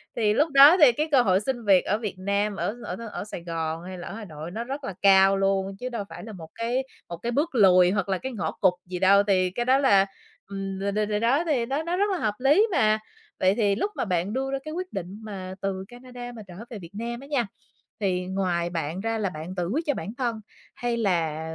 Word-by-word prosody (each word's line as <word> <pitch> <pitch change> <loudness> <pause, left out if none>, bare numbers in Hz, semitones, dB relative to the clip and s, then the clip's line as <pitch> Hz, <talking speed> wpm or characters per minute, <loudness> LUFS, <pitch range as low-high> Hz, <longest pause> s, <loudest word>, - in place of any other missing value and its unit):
Thì 210 -2 +2
lúc 300 +7 +2
đó 280 +6 +9
thì 295 -7 +7
cái 300 +6 -1
cơ 265 -3 +6
hội 190 -3 +3
xin 240 0 -3
việc 190 -3 +5
ở 210 - +1
Việt 215 -4 -5
Nam, 200 +2 0
ở 205 - -2
ở - - -4 0.2
ở - - -5
Sài 185 -5 -8
Gòn 165 -1 -3
hay 185 0 -7
là 175 - -8
ở - - -7
Hà 225 - -7
Nội 160 -1 -8
nó 225 +4 -4
rất 275 +3 -6
là 195 - -4
cao 195 0 +6
luôn 195 0 0
chứ 255 - -4
đâu 230 -4 -4
phải - - -9
là 220 -1 -8
một 165 -3 -10
cái 240 +3 -1 0.3
một 170 - -5
cái 235 +7 -3
bước 290 +2 -1
lùi 185 -4 +6
hoặc 200 -1 -1
là 190 - +1
cái 265 +7 -5
ngõ 220 - -3
cụt 185 -2 +2
gì 180 0 -5
đâu, 200 +1 +5
thì 185 -2 +2
cái 240 +6 -3
đó 260 +1 +4
là, 200 -8 +4 0.4
ừm, 195 -1 -5
rồi 200 +1 -1
rồi 210 +1 0
rồi 210 0 -1
đó 260 +9 +2
thì 260 -7 +1
nó 280 +5 -2
nó 345 +2 -1
rất 405 +1 +1
là 375 - 0
hợp 215 -8 0
lý 300 - +4
mà. 215 -8 +3 0.4
Vậy 190 +2 +3
thì 205 -4 +2
lúc 405 - -1
mà - - -1
bạn 185 +2 -1
đưa 270 +1 -2
ra 275 - 0
cái 310 +2 -6
quyết 365 -3 -5
định 190 +1 -5
mà 190 -3 -6
từ 190 -1 -2
Canada 245 0 -9
mà 225 - -8
trở 180 - -11 0.2
về 225 - -7
Việt 170 -3 -11
Nam 235 +3 -4
á 275 - -12
nha, 265 -7 0 0.5
thì 185 -3 0
ngoài 180 -2 -1
bạn 165 +1 -3
ra 225 0 -1
là 205 -3 -1
bạn 175 +2 -7
tự 175 -2 -2
quyết 305 - -1
cho 290 - +3
bản 210 - -6
thân, 235 -4 -2 0.3
hay 240 -1 -2
là 170 -8 0
205 Hz, 260 wpm, -25 LUFS, 185-245 Hz, 0.5 s, đó